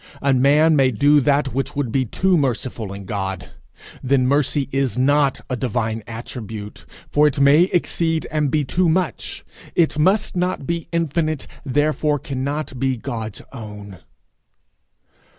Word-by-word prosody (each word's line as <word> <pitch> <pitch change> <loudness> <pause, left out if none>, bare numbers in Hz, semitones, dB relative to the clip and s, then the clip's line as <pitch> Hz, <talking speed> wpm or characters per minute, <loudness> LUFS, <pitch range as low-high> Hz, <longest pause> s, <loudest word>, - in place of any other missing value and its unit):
A 140 -1 +3
man 145 +5 +4
may 135 -2 +4
do 145 +5 +4
that 140 0 +1
which 135 +1 -2
would 140 -5 -1
be 130 +1 +1
too 185 - +1
merciful 125 - -1
in 100 0 -8
God! 95 -2 -4 0.5
Then 130 -1 +2
mercy 140 0 +1
is 135 -2 0
not 140 +1 +2
a 130 - -2
divine 115 -2 -2
attribute, 110 -2 -8 0.2
for 150 +1 +5
it 140 - -1
may 140 +5 +6
exceed 165 -2 0
and 150 -2 +1
be 150 +1 +1
too 175 +6 +1
much; 175 -1 -2 0.3
it 160 -3 +2
must 195 +7 +2
not 180 -4 -1
be 170 +1 -3
infinite, 160 -3 -1 0.2
therefore 150 +2 +1
cannot 140 0 -4
be 130 -1 0
God's 115 -4 -5
own. 105 -5 -9
140 Hz, 145 wpm, -21 LUFS, 125-155 Hz, 0.5 s, may